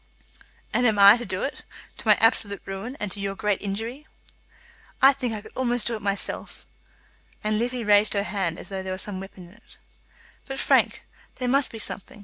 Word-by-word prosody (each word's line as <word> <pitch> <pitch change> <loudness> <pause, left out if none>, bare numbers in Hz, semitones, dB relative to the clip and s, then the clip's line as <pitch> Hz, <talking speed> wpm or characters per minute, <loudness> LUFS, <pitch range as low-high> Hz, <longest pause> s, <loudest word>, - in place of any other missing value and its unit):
"And 245 0 +3
I 200 0 +10
am 220 - +5
to 240 - -5
do 185 -2 -3
it, 275 - -4 0.4
to - - -9
my 210 - +8
absolute 220 -3 +2
ruin, 195 +8 -6
and 210 -2 -3
to 200 - -7
your 195 0 -3
great 210 -1 -1
injury?" 225 +9 -5 0.9
"I 270 +1 +7
think 255 -3 -3
I 215 -1 -4
could - - -14
almost 245 -3 0
do 235 - 0
it 215 - -7
myself." 200 0 -3 0.8
And 215 0 0
Lizzie 245 +1 -1
raised 205 -1 +4
her 200 - +1
hand 180 -3 -2
as - - -9
though 195 -1 -4
there 190 0 -4
were - - -4
some 195 0 -6
weapon 190 -2 -11
in - - -17
it. 230 - -20 0.7
"But, 270 -1 -5
Frank, - - +2 0.3
there 250 - -3
must 275 +2 +3
be 225 - -8
something. 210 -1 -4
210 Hz, 205 wpm, -25 LUFS, 195-240 Hz, 0.9 s, I